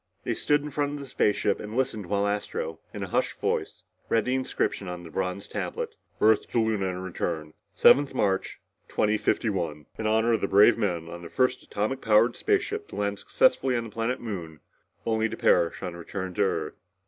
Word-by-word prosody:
They -, -, -1 dB
stood 145 Hz, 0 st, +1 dB
in 150 Hz, -, -6 dB
front 145 Hz, +1 st, -1 dB
of 145 Hz, -, -5 dB
the 140 Hz, -, -7 dB
spaceship 105 Hz, -5 st, +1 dB
and 105 Hz, +3 st, -6 dB
listened 120 Hz, -7 st, -1 dB
while 100 Hz, +1 st, +1 dB
Astro, 100 Hz, -5 st, -2 dB
in -, -, -5 dB
a -, -, -4 dB
hushed -, -, 0 dB
voice, -, -, -2 dB, 0.3 s
read 115 Hz, -2 st, +2 dB
the 125 Hz, -, 0 dB
inscription 130 Hz, -6 st, -1 dB
on 90 Hz, -1 st, -6 dB
the 85 Hz, -, -10 dB
bronze 95 Hz, +1 st, -3 dB
tablet. -, -, -4 dB, 0.2 s
" -, -, -39 dB
Earth 110 Hz, 0 st, +4 dB
to 120 Hz, -, +1 dB
Luna 110 Hz, -4 st, +1 dB
and 90 Hz, 0 st, -4 dB
return. 80 Hz, -4 st, -3 dB, 0.2 s
7th 145 Hz, 0 st, +6 dB
March 95 Hz, -1 st, 0 dB, 0.3 s
2051. 95 Hz, -7 st, 0 dB
In 110 Hz, -, -1 dB
honor 110 Hz, +2 st, +3 dB
of 115 Hz, -, +1 dB
the -, -, +1 dB
brave 100 Hz, +2 st, +6 dB
men 85 Hz, -5 st, -1 dB
of 85 Hz, +1 st, -8 dB
the 85 Hz, -, -9 dB
first 130 Hz, +4 st, +1 dB
atomic 110 Hz, +6 st, -2 dB
powered 110 Hz, +2 st, +4 dB
spaceship 415 Hz, 0 st, 0 dB
to -, -, -10 dB
land -, -, -1 dB
successfully 475 Hz, -, +2 dB
on 115 Hz, -, -1 dB
the 115 Hz, -, -7 dB
planet 115 Hz, +4 st, -1 dB
Moon, 85 Hz, -9 st, -6 dB, 0.5 s
only 110 Hz, 0 st, +1 dB
to -, -, -6 dB
perish 85 Hz, -, +2 dB
on 90 Hz, -2 st, -4 dB
return 95 Hz, +2 st, -5 dB
to 105 Hz, -, -1 dB
Earth...." 100 Hz, -, 0 dB
105 Hz, 200 wpm, -27 LUFS, 90-120 Hz, 0.5 s, 7th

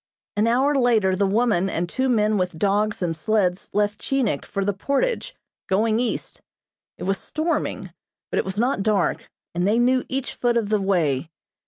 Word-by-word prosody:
An 210 Hz, +2 st, +2 dB
hour 260 Hz, +5 st, +3 dB
later, 230 Hz, -8 st, +3 dB
the 200 Hz, +1 st, +1 dB
woman 200 Hz, -3 st, +2 dB
and 175 Hz, 0 st, -2 dB
two 260 Hz, +9 st, -1 dB
men 215 Hz, -3 st, +2 dB
with 180 Hz, -4 st, -1 dB
dogs 205 Hz, +2 st, +1 dB
and 165 Hz, -2 st, -1 dB
sleds 185 Hz, +1 st, 0 dB
left 205 Hz, 0 st, 0 dB
Chinik 260 Hz, -, -1 dB
for 195 Hz, -1 st, -2 dB
the 205 Hz, -, +1 dB
Portage, 370 Hz, -, -1 dB, 0.3 s
going 215 Hz, +3 st, +2 dB
east. 245 Hz, -1 st, -3 dB, 0.6 s
It -, -, -7 dB
was 195 Hz, +1 st, 0 dB
storming, 315 Hz, +2 st, -2 dB, 0.4 s
but -, -, +1 dB
it -, -, +1 dB
was 190 Hz, +1 st, -4 dB
not 240 Hz, -1 st, +1 dB
dark, 200 Hz, -3 st, 0 dB, 0.2 s
and 175 Hz, +2 st, 0 dB
they 215 Hz, +3 st, +3 dB
knew 255 Hz, +1 st, +3 dB
each 270 Hz, 0 st, -2 dB
foot 240 Hz, -1 st, +1 dB
of 220 Hz, -3 st, 0 dB
the 210 Hz, -1 st, +2 dB
way. 165 Hz, -7 st, +1 dB
210 Hz, 180 wpm, -23 LUFS, 190-245 Hz, 0.6 s, hour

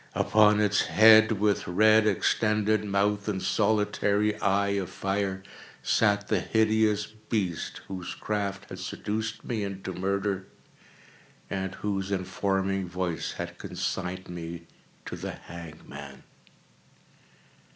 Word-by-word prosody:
Upon 105 Hz, -1 st, +4 dB
its 105 Hz, -1 st, +2 dB
head, 110 Hz, 0 st, +7 dB
with 105 Hz, 0 st, +1 dB
red 110 Hz, +4 st, +5 dB
extended 105 Hz, +1 st, +2 dB
mouth 100 Hz, 0 st, 0 dB
and 100 Hz, -3 st, -1 dB
solitary 105 Hz, 0 st, +1 dB
eye 100 Hz, 0 st, +2 dB
of 100 Hz, -3 st, -1 dB
fire, 95 Hz, -1 st, -2 dB, 0.4 s
sat 105 Hz, -2 st, +2 dB
the 105 Hz, -, +2 dB
hideous 110 Hz, 0 st, +2 dB
beast 105 Hz, -5 st, -3 dB
whose 95 Hz, -2 st, -6 dB
craft 100 Hz, -1 st, -3 dB
had 95 Hz, -, -8 dB
seduced 110 Hz, +3 st, -4 dB
me 110 Hz, -4 st, -2 dB
into 95 Hz, -1 st, -5 dB
murder, 95 Hz, +1 st, -1 dB, 1.0 s
and 95 Hz, -1 st, -3 dB
whose 95 Hz, -2 st, -2 dB
informing 95 Hz, 0 st, -1 dB
voice 90 Hz, -2 st, -3 dB
had -, -, -6 dB
consigned 95 Hz, 0 st, -4 dB
me 85 Hz, -1 st, -7 dB, 0.4 s
to -, -, -5 dB
the -, -, -5 dB
hangman. 75 Hz, -5 st, -10 dB
100 Hz, 110 wpm, -27 LUFS, 95-105 Hz, 1.0 s, head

